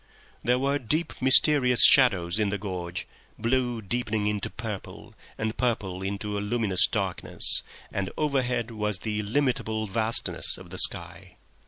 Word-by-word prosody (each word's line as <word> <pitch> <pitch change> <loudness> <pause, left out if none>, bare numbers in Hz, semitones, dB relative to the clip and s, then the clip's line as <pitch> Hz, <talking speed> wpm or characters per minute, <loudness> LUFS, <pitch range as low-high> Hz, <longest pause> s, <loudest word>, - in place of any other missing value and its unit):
There 125 +1 +1
were 140 +2 -1
deep, 155 +7 -2
mysterious 130 -1 +6
shadows 95 -8 +4
in 105 -2 0
the 100 - -3
gorge, 90 -3 -6 0.3
blue 120 0 -2
deepening 110 0 -3
into 105 -1 -2
purple, 105 -3 -9 0.2
and 110 +1 -3
purple 100 -7 -3
into 100 +1 -4
a - - -4
luminous 105 -3 +3
darkness, 95 -3 0 0.3
and 100 -1 -3
overhead 125 -6 -2
was 105 -2 -2
the 105 +2 -4
illimitable 110 -1 -2
vastness 110 +3 0
of - - -14
the - - -4
sky. - - 0
110 Hz, 140 wpm, -25 LUFS, 100-125 Hz, 0.3 s, mysterious